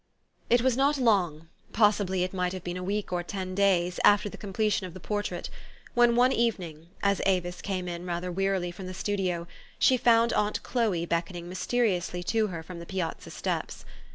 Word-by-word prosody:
It 240 0 +4
was 260 -2 +3
not 280 +3 +3
long, 180 - +1 0.3
possibly 205 -4 +3
it 185 - -3
might 180 -1 -1
have 185 -2 -6
been 175 0 -4
a 180 - -4
week 200 0 -2
or 175 - 0
ten 185 +1 -5
days, 185 -2 +2
after 205 0 +5
the - - -9
completion 205 -1 -1
of 175 - -12
the - - -7
por 205 +3 -2
trait, 210 - -4 0.5
when 240 -1 +4
one 250 +2 +5
evening, 175 -10 -1 0.2
as 200 -1 +2
Avis 180 -2 0
came 185 -2 -3
in 175 0 -5
rather 180 0 -3
wearily 190 -1 0
from 185 +1 -8
the 185 - -6
studio, 185 -4 -1 0.3
she 260 - +4
found 235 -1 +4
aunt 210 0 0
Chloe 210 -9 0
beck 170 +1 -1
oning 175 -2 -7
mysteriously 180 -1 -1
to 220 +3 +1
her 170 -4 -6
from 175 +1 -9
the 170 - -9
piazza 185 -4 -4
steps. - - -4
190 Hz, 195 wpm, -28 LUFS, 175-210 Hz, 0.5 s, after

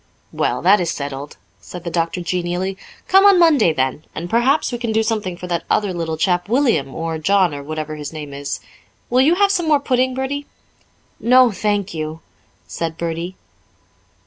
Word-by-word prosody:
"Well, 125 +3 -1
that 195 +2 +5
is 170 - -1
settled," 140 -2 -5 0.2
said 180 -1 -10
the 170 - -4
doctor 170 +1 -1
genially. 180 +2 -2 0.3
"Come 385 +1 +6
on 400 -2 +7
Monday 320 - +5
then. 130 0 -1
And 170 +2 -5
perhaps 260 +7 +2
we 240 - -4
can 235 -2 -2
do 220 0 +2
something 210 -5 -2
for 180 - -7
that 170 -2 -2
other 205 -3 +1
little 165 -2 -3
chap, 175 +3 0
William, 230 - +1
or 165 -1 -3
John, 185 0 +2
or 140 - -5
whatever 155 +1 -5
his 150 -1 -6
name 150 -3 -7
is. 140 0 -4 0.5
Will 250 +1 +4
you 310 +6 +4
have 400 +1 +3
some 350 -4 0
more 300 -2 +4
pudding, 255 -2 0
Bertie?" 280 +2 -3 0.7
"No, 250 0 +5
thank 205 -1 -1
you," 155 0 -5 0.4
said 165 -1 -4
Bertie. 170 +2 -4
180 Hz, 180 wpm, -19 LUFS, 160-245 Hz, 0.7 s, on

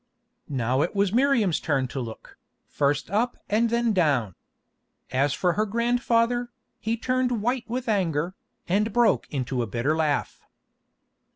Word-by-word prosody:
Now 130 -1 0
it 175 - -1
was 200 -1 +1
Miriam's 240 - +3
turn 135 -4 0
to 135 - -4
look, 115 -3 -8 0.3
first 145 +3 -1
up 235 +4 0
and 225 +3 +2
then 235 -1 +1
down. 140 - +2 0.8
As 135 +3 +2
for 180 -2 +1
her 215 +4 +1
grandfather, 240 +1 +1 0.3
he 225 +1 -1
turned 250 0 0
white 245 0 0
with 245 +1 -3
anger, 175 -5 0 0.3
and 210 +5 +1
broke 240 0 +3
into 130 -2 -2
a 115 - -2
bitter 120 +9 0
laugh. 155 -3 -1
200 Hz, 145 wpm, -25 LUFS, 145-235 Hz, 0.8 s, Miriam's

